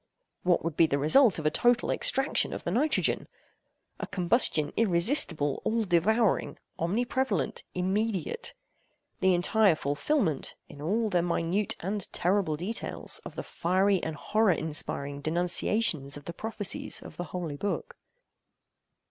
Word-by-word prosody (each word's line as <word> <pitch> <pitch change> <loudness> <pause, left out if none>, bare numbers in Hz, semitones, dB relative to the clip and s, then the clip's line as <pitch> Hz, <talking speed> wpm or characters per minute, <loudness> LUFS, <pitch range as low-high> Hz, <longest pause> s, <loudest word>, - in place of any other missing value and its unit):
What 180 -1 +2
would 165 -2 -3
be 165 - +4
the 140 - 0
result 190 - +5
of 155 - -6
a 155 - +3
total 240 +7 +2
extraction 270 +1 +2
of - - -6
the 170 - -2
nitrogen? 280 - +1 0.7
A - - -4
combustion 175 - +2
irresistible, 170 - +2
all 230 0 0
devouring, 205 +4 +1 0.2
omni 195 +9 0
prevalent, 260 +2 -1
immediate;—the 190 -1 -3
entire 195 +1 +3
fulfilment, 155 - -1
in 145 - -12
all 215 +7 0
their 175 -2 +2
minute 175 +3 0
and 195 +2 -3
terrible 180 -4 0
details, 195 +8 -4
of - - -9
the - - -5
fiery 190 +2 +1
and 160 - -4
horror 215 +5 +2
inspiring 145 -2 -2
denunciations 170 -2 +1
of 145 - -13
the 170 - -6
prophecies 220 +1 -2
of - - -12
the 175 - -4
Holy 170 -6 -5
Book. 205 - -4
180 Hz, 135 wpm, -28 LUFS, 160-220 Hz, 0.7 s, result